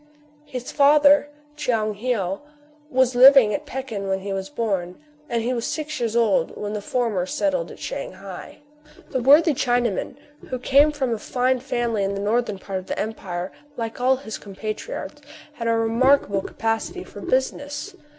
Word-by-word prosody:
His 255 Hz, -3 st, -6 dB
father, 290 Hz, 0 st, +5 dB, 0.3 s
Tchoung 220 Hz, -7 st, 0 dB
Heou, 200 Hz, -7 st, -1 dB, 0.5 s
was 260 Hz, -1 st, +2 dB
living 255 Hz, -3 st, +8 dB
at 300 Hz, 0 st, -4 dB
Pekin 255 Hz, -8 st, -5 dB
when 190 Hz, 0 st, -1 dB
he 195 Hz, 0 st, -4 dB
was 195 Hz, +4 st, -4 dB
born; 195 Hz, -10 st, -2 dB, 0.3 s
and 230 Hz, -1 st, 0 dB
he 250 Hz, +2 st, 0 dB
was 235 Hz, -2 st, -2 dB
six 310 Hz, 0 st, -4 dB
years 230 Hz, -2 st, -1 dB
old 215 Hz, -8 st, +2 dB
when 210 Hz, 0 st, -4 dB
the 210 Hz, -, -3 dB
former 210 Hz, -6 st, -1 dB
settled 305 Hz, -, -1 dB
at -, -, -11 dB
Shang -, -, -5 dB
hai. -, -, -10 dB, 0.5 s
This 260 Hz, -, 0 dB
worthy 295 Hz, +5 st, +6 dB
Chinaman, 245 Hz, -5 st, 0 dB, 0.3 s
who 255 Hz, -, -2 dB
came 280 Hz, +4 st, +4 dB
from 265 Hz, -5 st, -1 dB
a 225 Hz, -, -3 dB
fine 255 Hz, +3 st, 0 dB
family 240 Hz, -4 st, -1 dB
in 195 Hz, +1 st, -1 dB
the -, -, -3 dB
northern 210 Hz, 0 st, 0 dB
part 190 Hz, 0 st, -4 dB
of 185 Hz, -, -12 dB
the -, -, -3 dB
empire, 185 Hz, -4 st, -4 dB, 0.3 s
like 230 Hz, 0 st, -4 dB
all 260 Hz, +1 st, +4 dB
his 255 Hz, -5 st, -7 dB
compatriots, 215 Hz, -, -6 dB, 0.3 s
had 230 Hz, -5 st, -4 dB
a 230 Hz, -, +3 dB
remarkable 225 Hz, -2 st, +3 dB
capacity 225 Hz, +3 st, -3 dB
for 205 Hz, -, -11 dB
business. 285 Hz, -, -2 dB
240 Hz, 170 wpm, -23 LUFS, 210-270 Hz, 0.5 s, living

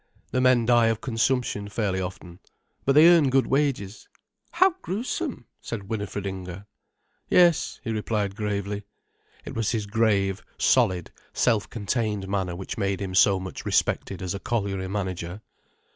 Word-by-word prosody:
The 130 Hz, -, +1 dB
men 125 Hz, -2 st, +4 dB
die 120 Hz, -1 st, +5 dB
of 115 Hz, -1 st, 0 dB
consumption 115 Hz, -3 st, -1 dB
fairly 100 Hz, -3 st, -1 dB
often. 90 Hz, -1 st, -7 dB, 0.5 s
But 135 Hz, -, +4 dB
they 155 Hz, +4 st, +8 dB
earn 165 Hz, -5 st, +6 dB
good 135 Hz, 0 st, +3 dB
wages." 130 Hz, -8 st, -1 dB, 0.4 s
"How 370 Hz, +3 st, +5 dB
gruesome!" 245 Hz, -, -3 dB, 0.2 s
said 105 Hz, -4 st, -6 dB
Winifred 105 Hz, -2 st, -3 dB
Inger. 95 Hz, 0 st, -6 dB, 0.6 s
"Yes," 175 Hz, -3 st, +4 dB
he 115 Hz, -, -3 dB
replied 105 Hz, -2 st, -1 dB
gravely. 105 Hz, -1 st, -2 dB, 0.6 s
It -, -, -6 dB
was 115 Hz, -2 st, -1 dB
his 110 Hz, -3 st, -1 dB
grave, 100 Hz, -2 st, +1 dB
solid, 95 Hz, -9 st, +2 dB, 0.2 s
self 110 Hz, -4 st, +1 dB
contained 105 Hz, -2 st, -2 dB
manner 95 Hz, -3 st, -2 dB
which 95 Hz, +4 st, -6 dB
made 100 Hz, -2 st, 0 dB
him 95 Hz, -2 st, -4 dB
so 95 Hz, +1 st, +5 dB
much 95 Hz, -1 st, -7 dB
respected 95 Hz, -2 st, 0 dB
as 90 Hz, -, -2 dB
a 100 Hz, -, -4 dB
colliery 100 Hz, -4 st, -2 dB
manager. 95 Hz, -1 st, -4 dB
105 Hz, 145 wpm, -25 LUFS, 95-120 Hz, 0.6 s, they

